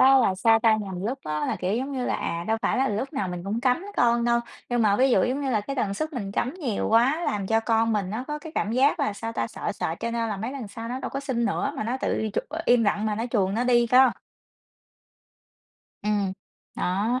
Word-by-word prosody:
á, 270 +1 +7
là 225 -7 +3
sao 225 +4 +4
ta? 220 -1 +4
Nhằm 195 -3 -5
lúc 250 +6 -2
á 150 -1 -2
là, - - -1
kiểu, 185 +3 -1
giống 265 +3 -3
như 255 -2 -2
là, - - 0
à, 170 0 -3
đâu 225 - +2
phải - - +1
là 270 +1 +2
lúc 220 +8 -2
nào 205 -10 -2
mình 180 -1 -5
cũng 215 +4 -2
cấm 255 +7 +1
con 235 0 +3
đâu. 235 0 +3 0.3
Nhưng 240 -1 +1
mà 205 -2 +4
ví 260 +2 +4
dụ, - - +4
giống 260 +3 -1
như 275 -2 -1
là, 215 -4 +2
cái 275 +7 -5
tần 200 -6 0
suất 310 +9 -3
mình 200 -7 -4
cấm 255 +7 -1
nhiều 270 - -2
quá, 255 +9 +3
làm 200 -2 -1
cho 225 +2 +2
con 225 0 +2
mình 200 -3 -1
nó 235 +5 -3
có 300 0 -3
cái 310 +1 -10
cảm 210 +2 -1
giác 270 +4 +3
là 210 - +1
sao 225 +3 -5
ta? 115 - -1
Sợ - - -4
sợ, 160 - -2
cho 230 0 -2
nên 230 -1 -1
là 210 - -2
mấy 225 +6 -4
lần 260 -6 -6
sau 225 +3 -7
nó 250 +2 -3
đâu - - -3
có 275 - -3
xin 260 -4 -1
nữa, 275 +3 0
mà 215 - -2
nó 240 +4 -1
tự - - 0
đi 220 - -1
chụp - - -2
ờ, 320 +2 -4
im 245 -1 +5
lặng 205 +1 +1
mà 215 - 0
nó 225 +3 -2
chuồn 195 -4 +1
nó 235 +3 0
đi 240 -1 +4
có 255 +1 +6 1.9
Ừm, 205 -2 0 0.4
đó, 210 +8 0
230 Hz, 270 wpm, -25 LUFS, 205-255 Hz, 1.9 s, á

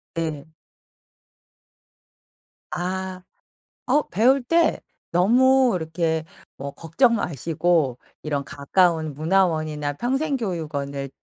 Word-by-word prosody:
네. 160 -2 -4 2.2
아. 185 +1 -3 0.7
어 295 +3 +4
배울 250 +7 +3
때 330 +5 +2 0.3
너무 255 +8 +4
이렇게 160 0 -1 0.3
뭐 140 +1 -5
걱정 230 - +2
마시고 165 - 0 0.2
이런 145 -2 -2
가까운 155 +2 +1
문화원이나 155 -3 0
평생 270 - -1
교육원을 145 - -4
170 Hz, 175 characters per minute, -23 LUFS, 150-225 Hz, 2.2 s, 어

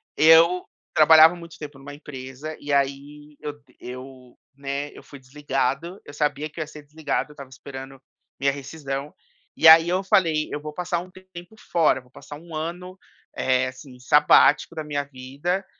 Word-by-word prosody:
Eu 165 +3 +5 0.3
trabalhava 160 +2 +7
muito 170 -1 -12
tempo 145 -2 -9
numa 140 +1 -10
empresa, 145 +1 -9
e 145 - -6
aí 140 +2 -2
eu 145 0 -7 0.2
eu, 130 0 -11 0.2
né, 140 +1 -5
eu - - -14
fui 140 - -13
desligado, 140 +5 -3
eu 145 - -11
sabia 150 0 -1
que 155 - -11
eu - - 0
ia - - -12
ser 150 0 -12
desligado, 150 0 -3
eu - - -13
estava 140 -2 -11
esperando 135 0 -10 0.4
minha 140 0 +2
rescisão, 140 0 -6 0.4
e - - +4
aí 160 +1 +9
eu 185 +2 0
falei: 165 -5 +2
"Eu - - -3
vou 150 0 -7
passar 175 +1 -2
um 180 +1 -10
tempo 185 +1 -13 0.2
fora, 165 -5 +3
eu - - -18
vou 125 - -26
passar 145 - -11
1 165 0 -11
ano, 175 +4 -6 0.4
eh, 130 0 +1
assim, 130 0 -11
sabático 150 +5 +4
da 155 - -4
minha 145 -1 -3
vida, 140 +8 -4
150 Hz, 180 wpm, -23 LUFS, 135-160 Hz, 0.4 s, aí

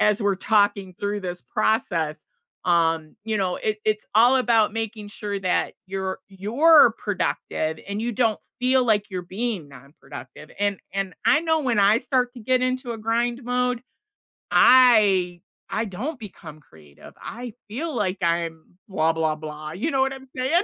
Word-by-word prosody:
as 210 +1 +3
we're 200 -1 +2
talking 200 -2 +1
through 205 0 -2
this 180 -1 -5
process, 160 -8 -1 0.4
um, 165 -3 +1
you 220 -2 -1
know, 185 -2 0
it 215 0 -2
it's 215 0 0
all 240 +4 +6
about 230 -5 +3
making 225 -2 -4
sure 205 -1 -4
that 185 -2 0
you're 190 0 -4
you're 235 - +5
productive, 160 -5 -2
and 205 +2 -3
you 240 - -2
don't 225 -1 +1 0.2
feel 255 0 +3
like 210 -3 +1
you're 180 -1 -4
being 195 -3 -4
nonproductive, 140 +1 -12
and 205 -2 0
and 195 -2 -3
I 305 - +5
know 320 -1 +1
when 245 -6 0
I 205 +2 +5
start 250 0 0
to 245 - -10
get 255 +3 +1
into 255 -1 -1
a 225 - -7
grind 235 +3 -1
mode, 250 0 0 0.7
I 205 -9 +5 0.3
I 225 - -1
don't 250 - -5
become 165 -7 -11
creative. 75 - -17
I 240 -1 -7 0.2
feel 305 +9 -4
like 195 -4 -1
I'm 170 0 -2
blah, 165 -4 +1
blah, 160 -1 0
blah, 155 0 -8
you 195 - -2
know 270 - +1
what 270 0 +2
I'm 265 0 -11
saying? 285 +9 +2
205 Hz, 165 wpm, -24 LUFS, 175-245 Hz, 0.7 s, all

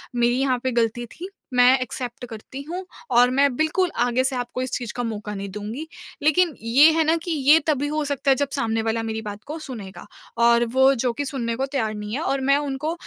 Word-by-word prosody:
मेरी 240 +1 +2
यहाँ 260 -2 +1
पे 260 - 0
गलती 235 0 0
थी, 345 - -9 0.2
मैं 250 +1 +6
एक्सेप्ट 245 0 -5
करती 230 +4 -8
हूँ 365 +2 -5 0.3
और 245 +1 +6
मैं 275 -1 +2
बिल्कुल 325 +4 +1
आगे 245 +1 +1
से 265 0 +1
आपको 245 0 -4
इस 255 - -3
चीज़ 240 -3 -6
का 245 - -3
मौका 210 -2 -4
नहीं 195 0 -5
दूँगी। 215 +10 -6 0.4
लेकिन 330 +2 +3
ये 255 +7 +6
है 320 0 +2
ना 320 - +3
कि 345 - -4
ये 295 +1 +5
तभी 290 -1 +1
हो 305 +1 -1
सकता 280 -1 0
है - - +5
जब 280 +1 -1
सामने 225 -3 0
वाला 225 0 -1
मेरी 220 0 -3
बात 210 -1 -8
को 305 +2 -5
सुनेगा। 225 -10 -9 0.4
और 235 0 +5
वो 265 +1 +5
जो 245 0 0
कि 285 +5 -3
सुनने 235 -4 -3
को 265 - -1
तैयार 260 -6 -2
नहीं 210 0 -6
है 290 - -2
और 275 -3 -1
मैं 280 - +5
उनको 290 +2 -2
255 Hz, 230 wpm, -23 LUFS, 230-285 Hz, 0.4 s, मैं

